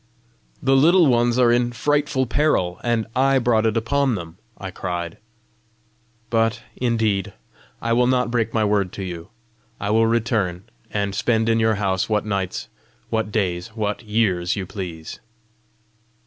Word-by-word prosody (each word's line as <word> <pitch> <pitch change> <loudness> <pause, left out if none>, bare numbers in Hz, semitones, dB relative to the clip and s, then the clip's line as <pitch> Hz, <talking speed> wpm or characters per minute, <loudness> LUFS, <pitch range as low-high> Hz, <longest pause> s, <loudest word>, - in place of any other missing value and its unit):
"The 135 0 +4
Little 170 +6 +6
Ones 120 -2 +3
are 120 -2 +5
in 120 0 +2
frightful 145 +1 +1
peril, 110 - +1
and 120 -2 +1
I 135 +1 +3
brought 115 -3 +2
it 110 +1 0
upon 135 +2 +1
them!" 85 -2 -8 0.2
I 95 -1 -6
cried. 85 -2 -4 0.6
" 115 0 -40
But 115 +1 +1
indeed 110 -5 0 0.5
I 115 0 +1
will 120 +1 +3
not 125 -2 +1
break 115 -2 0
my 110 -2 +1
word 100 -3 +1
to 100 - -5
you. 85 0 -7 0.5
I 100 - -2
will 115 +1 +4
return, 110 -6 0 0.3
and 100 -1 -2
spend 110 +2 +1
in 115 0 +3
your 110 0 +3
house 95 -1 -1
what 105 -1 +1
nights 100 -3 -3 0.4
what 110 -2 -1
days 95 0 -2
what 105 -1 -2
years 105 -6 0
you 100 -3 -3
please." 90 -5 -7
110 Hz, 155 wpm, -22 LUFS, 100-120 Hz, 0.6 s, Little